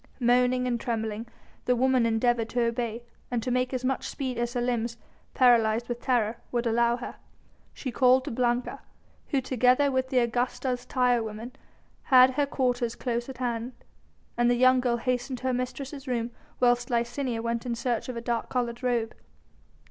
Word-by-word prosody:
Moaning 250 +1 +3
and 240 -2 -1
trembling, 225 -2 -3 0.4
the 250 - +3
woman 255 -1 +3
endeavoured 230 0 +1
to 240 +1 0
obey 235 0 -2 0.3
and 240 -2 -2
to 250 - -2
make 250 0 0
as 255 -1 -3
much 265 0 -1
speed 260 -3 -4
as 240 0 -1
her - - +1
limbs, 240 -1 -1 0.4
paralysed 235 -2 +4
with 240 -1 -4
terror, 235 -3 +1
would 240 -1 -1
allow 235 +1 +2
her. 245 - -8 0.5
She 260 - -6
called 255 +1 +4
to - - -4
Blanca, 240 +1 -1 0.5
who 275 -3 0
together 255 +2 +3
with 260 0 0
the 260 - 0
Augusta's 245 +1 0
tire 250 -2 +2
women 220 +2 -6 0.5
had 255 -1 +7
her 285 +2 0
quarters 245 -4 0
close 240 0 -3
at 265 - -8
hand, 240 0 -3 0.6
and 240 0 +3
the 245 - +3
young 255 +1 +5
girl 245 -1 +1
hastened 250 +2 -2
to 245 - -15
her 260 -1 +1
mistress's 265 +3 -5
room 240 -2 -1 0.3
whilst 245 -1 +2
Licinia 240 0 -1
went 235 +1 -2
in 235 - -1
search 240 0 -2
of 245 - -4
a - - -4
dark 235 -1 -2
coloured 240 -1 -2
robe. 240 -3 0
245 Hz, 180 wpm, -27 LUFS, 235-255 Hz, 0.6 s, had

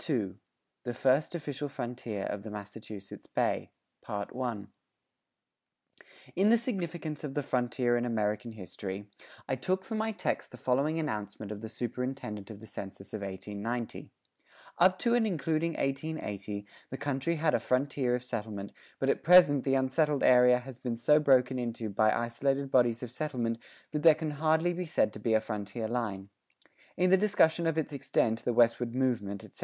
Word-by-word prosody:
II 105 - 0 0.5
THE 120 -1 -4
FIRST 135 +6 +2
OFFICIAL 145 -3 -4
FRONTIER 120 -6 -4
OF 100 - -3
THE 110 - -8
MASSACHUSETTS 105 -1 -9
BAY[39:1] 105 +1 -3 1.7
In 195 +4 +4
the 235 - +7
Significance 175 - -4
of 140 -2 -5
the 145 - 0
"Frontier 125 -2 +1
in 120 - 0
American 110 0 -1
History," 100 -1 -6 0.4
I 130 - 0
took 185 +8 -1
for 230 - -6
my 220 0 0
text 215 - -2
the - - -11
following 140 +5 +1
announcement 105 -7 -4
of 105 -1 -6
the 110 - -6
Superintendent 120 -2 -4
of 105 -2 -9
the - - -10
Census 100 -1 -9
of 110 - -4
1890: 105 +5 -4 0.7
Up 185 +1 +6
to 235 +3 +1
and 235 -2 +3
including 165 -1 0
1880 105 -9 -3 0.2
the 130 - -5
country 145 +3 -1
had 155 -1 +1
a - - +3
frontier 130 +1 +1
of 125 - -4
settlement 105 -4 -4 0.3
but - - -1
at - - +2
present 170 -6 +7
the 135 -1 +2
unsettled 140 +2 +2
area 125 0 +7
has 125 0 -9
been 125 -3 -3
so 150 +6 +5
broken 130 -3 +4
into 115 -3 -3
by 110 +2 +4
isolated 135 +4 0
bodies 120 -2 +3
of 120 - -6
settlement 125 -5 -2 0.3
that 150 - -1
there 160 -1 +8
can 155 -1 -3
hardly 160 +4 +2
be 180 0 -4
said 110 - +2
to - - -8
be 110 +1 +2
a - - +5
frontier 105 +1 -4
line. 105 -5 -3 0.7
In 180 0 +3
the 190 - +8
discussion 175 -5 +3
of 165 -1 0
its 155 -1 -1
extent, 115 -4 0
the 125 - +1
westward 120 0 +3
movement, 110 -7 0
etc. - - -13
125 Hz, 170 wpm, -30 LUFS, 110-150 Hz, 1.7 s, there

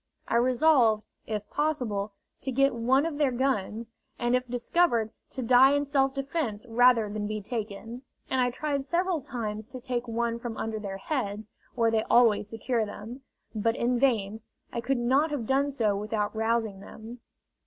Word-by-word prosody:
I 235 - +2
resolved, 245 -3 +4 0.2
if 210 -1 -3
possible, 225 -10 -1 0.3
to 265 - -3
get 275 +2 +3
one 255 +5 +2
of 310 -3 -3
their 290 -3 +3
guns, 235 -4 -1 0.3
and 240 +1 +1
if 250 0 -1
discovered 240 -1 +1 0.2
to 260 - -5
die 255 +3 +6
in 285 0 +1
self 270 -1 +1
defence 275 -6 -3
rather 240 -1 +4
than 205 0 -3
be 215 0 -3
taken; 220 +2 -6 0.3
and 260 - +1
I 245 - +3
tried 280 +2 -2
several 345 +2 0
times 215 -4 -4
to 255 - -8
take 245 -1 -3
one 235 0 -1
from 235 -2 -6
under 220 -1 -3
their 195 -2 -5
heads, 215 -3 -3 0.3
where 230 -2 +2
they 220 -1 +2
always 220 -4 +4
secure 230 +1 -1
them. 215 +5 -8 0.3
But 225 +1 0
in 240 +1 0
vain; 220 -5 +1 0.3
I 235 - -2
could 270 +2 0
not 265 +6 +2
have 285 -6 -3
done 275 +4 +2
so 225 -7 0
without 210 +1 -2
rousing 220 -2 0
them. 225 +4 -10
235 Hz, 175 wpm, -28 LUFS, 220-265 Hz, 0.3 s, die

